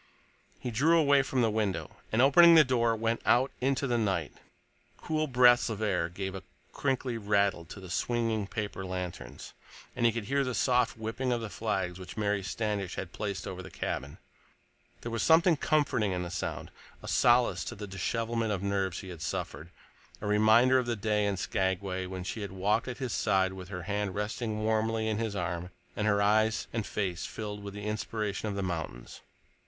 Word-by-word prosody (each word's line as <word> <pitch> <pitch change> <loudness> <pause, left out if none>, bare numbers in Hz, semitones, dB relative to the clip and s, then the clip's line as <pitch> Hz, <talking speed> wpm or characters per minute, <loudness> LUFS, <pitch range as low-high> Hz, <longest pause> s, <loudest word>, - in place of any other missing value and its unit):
He 125 - -4
drew 155 +9 +4
away 140 -3 +5
from 130 -2 0
the 110 - +2
window 105 -3 -2
and, 115 +3 +4
opening 170 +5 +8
the 160 - +9
door, 120 -3 +2
went 115 +1 -1
out 130 +3 +3
into 135 +1 +1
the 120 -3 +1
night. 95 -8 -1 0.6
Cool 155 -1 -1
breaths 125 -2 +5
of 110 -2 -4
air 90 -6 0
gave 95 +2 -5
a 95 - -6 0.3
crinkly 130 -3 -1
rattle 100 -4 +1
to 95 +5 -10
the 95 - -10
swinging 115 -1 0
paper 105 -2 -4
lanterns, 90 -2 -6 0.4
and 120 - -2
he 115 - +5
could 115 0 -4
hear 140 +6 +1
the 125 -2 -2
soft 125 -2 +2
whipping 115 +4 -2
of 120 - +1
the 110 -3 -6
flags 95 -5 -2
which 95 - -9
Mary 105 -1 0
Standish 100 -1 -3
had 95 -3 -6
placed 100 -3 -4
over - - -6
his - - -10
cabin. 70 +1 -4 0.8
There 115 - -5
was 115 - -1
something 165 +1 +5
comforting 140 -9 +1
in 90 0 -2
the 85 - -6
sound, 90 - -4 0.3
a - - -8
solace 120 0 +3
to - - -5
the 105 - -6
dishevelment 115 +4 -2
of 100 -2 -2
nerves 95 -3 -1
he 95 - -9
had 85 -3 -9
suffered, 80 +1 -4 0.5
a - - -7
reminder 110 +5 +5
of 125 - -2
their 120 - 0
day 105 0 0
in 100 -1 -1
Skagway 95 0 -1
when 95 0 -5
she 110 +4 -5
had 100 - -5
walked 100 +5 0
at 125 - -5
his 130 -4 -3
side 95 0 +2
with 95 -1 -9
her 90 -3 -5
hand 100 0 -2
resting 110 +1 -3
warmly 110 0 +1
in 110 -1 -1
his 110 -3 -2
arm 90 -1 -3 0.3
and 105 - -1
her 100 -1 +3
eyes 110 +1 +2
and 115 -3 -2
face 95 -4 -2
filled 105 -1 -6
with 100 0 -7
the 105 0 -6
inspiration 105 -1 -3
of 100 - -3
the 100 - -2
mountains. 80 -9 -5
105 Hz, 195 wpm, -30 LUFS, 95-120 Hz, 0.8 s, the